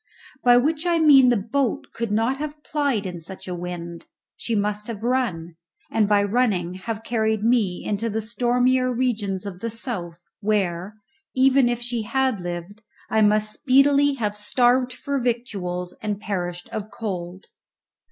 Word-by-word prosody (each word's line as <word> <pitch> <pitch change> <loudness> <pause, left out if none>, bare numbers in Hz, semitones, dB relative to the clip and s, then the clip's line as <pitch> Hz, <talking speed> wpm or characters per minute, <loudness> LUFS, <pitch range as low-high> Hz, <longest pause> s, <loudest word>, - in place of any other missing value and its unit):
By 245 -1 +7
which 305 +6 +1
I 340 -1 +3
mean 280 -5 +7
the 240 - +3
boat 235 +4 -1
could 230 -2 -3
not 230 +6 +1
have 300 0 -6
plyed 280 -9 0
in 180 -2 -5
such 190 +4 -9
a 180 - -3
wind; 170 -1 -6 0.3
she 230 - -2
must 210 0 -1
have 225 -2 -6
run, 195 -10 -1 0.3
and 215 -2 +2
by 205 -1 +4
running 200 -5 +1
have 220 +4 -5
carried 220 -2 0
me 220 -6 +1
into 210 +3 -1
the 220 +1 -2
stormier 250 +3 +1
regions 215 -6 -1
of 190 -3 -6
the 230 - -3
south, 195 -7 -4 0.2
where, 200 -2 -1 0.4
even 260 -1 +4
if 240 0 -2
she 240 -1 -2
had 260 0 0
lived, 175 +4 -6 0.3
I 220 - +3
must 215 0 +3
speedily 280 +1 +4
have 210 -5 -2
starved 245 +4 +2
for 280 +2 -3
victuals 200 -8 -3
and 210 -2 -2
perished 175 -4 -4
of 215 -1 -5
cold. 185 -4 -5
220 Hz, 160 wpm, -23 LUFS, 195-250 Hz, 0.4 s, By